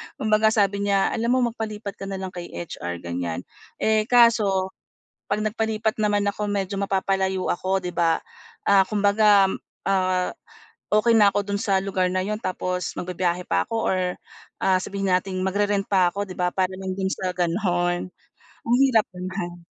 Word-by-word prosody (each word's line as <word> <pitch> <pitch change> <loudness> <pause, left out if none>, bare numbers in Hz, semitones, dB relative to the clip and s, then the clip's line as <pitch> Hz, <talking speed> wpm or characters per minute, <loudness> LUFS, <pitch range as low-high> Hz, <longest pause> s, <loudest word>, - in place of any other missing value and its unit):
kumbaga 215 0 +2
sabi 200 -2 +1
niya, 195 -1 +2
"alam 230 +1 -1
mo 245 -2 +2
magpalipat 215 -3 -6
ka 195 - -6
na 195 - -4
lang 190 -1 -5
kay 175 -1 -7
HR," 85 - -6
ganyan. 85 -1 -3 0.4
Eh, 220 0 +2
kaso 215 -6 +4 0.6
'pag 205 - +1
nagpalipat 220 0 -1
naman 205 -1 +1
ako 205 +1 -1
medyo 200 -1 -2
mapapalayo 190 -1 0
ako 190 +2 0
'di 180 -2 -6
ba? 165 -1 +2 0.5
Ah, 200 -1 +6
kumbaga, 205 0 +4 0.4
ah, 185 -2 +1 0.6
okey 230 +2 +4
na 205 -2 +7
ako - - +2
do'n 200 - 0
sa 195 -2 +2
lugar 190 -2 0
na 185 0 0
yun 210 +2 -2
tapos 180 -2 -3
magbibiyahe 180 0 -1
pa - - +1
ako 230 - -6 0.2
or, 190 - +1 0.6
ah, 190 -1 +4
sabihin 195 0 -2
natin 185 0 0
magre-rent 200 +1 +1
pa 185 -3 +4
ako 200 - -2
'di 185 - -8
ba, 180 0 +1
para 190 -1 0
lang 190 -1 -4
do'n 190 0 -2
sa 185 -1 -2
gano'n, 175 0 0 0.6
ang 235 - +3
hirap 230 -5 +3
naman. 180 -1 -6
195 Hz, 165 wpm, -24 LUFS, 185-210 Hz, 0.6 s, na